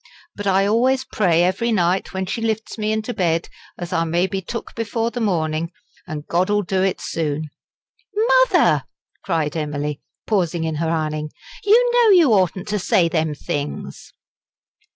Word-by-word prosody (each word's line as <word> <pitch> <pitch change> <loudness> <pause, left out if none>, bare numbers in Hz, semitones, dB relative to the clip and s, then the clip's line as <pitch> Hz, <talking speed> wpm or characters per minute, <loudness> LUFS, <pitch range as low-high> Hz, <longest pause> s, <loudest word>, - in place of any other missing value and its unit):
But 205 0 -4
I 195 0 +3
always 255 +5 +2
pray 175 -9 +2
every 210 +6 +1
night, 185 -2 +1
when 190 -1 -3
she 225 - -3
lifts 220 -1 -2
me 215 -1 -1
into 220 +2 -2
bed, 170 -4 0 0.3
as 175 -1 -6
I 165 - +2
may 170 +2 +1
be 190 +1 -3
took 230 +5 -6
before 230 +1 -2
the 245 - -4
morning, 165 -5 -1 0.4
an' 155 -3 -5
God 180 +3 +1
ull 205 0 +2
do 190 +1 0
it 190 -1 0
soon." 155 -1 -3 1.0
"Mother!" - - +3 0.4
cried 160 -5 -1
Emily, 150 -2 -3 0.2
pausing 175 -5 0
in 160 -1 -2
her 160 +1 -1
ironing, 155 -2 -2 0.3
"you 480 +4 +5
know 480 -2 +5
you 305 -10 +5
oughtn't 185 -1 +1
to 210 0 0
say 175 -2 +2
them 160 -2 0
things." 145 0 -5
185 Hz, 165 wpm, -21 LUFS, 160-215 Hz, 1.0 s, you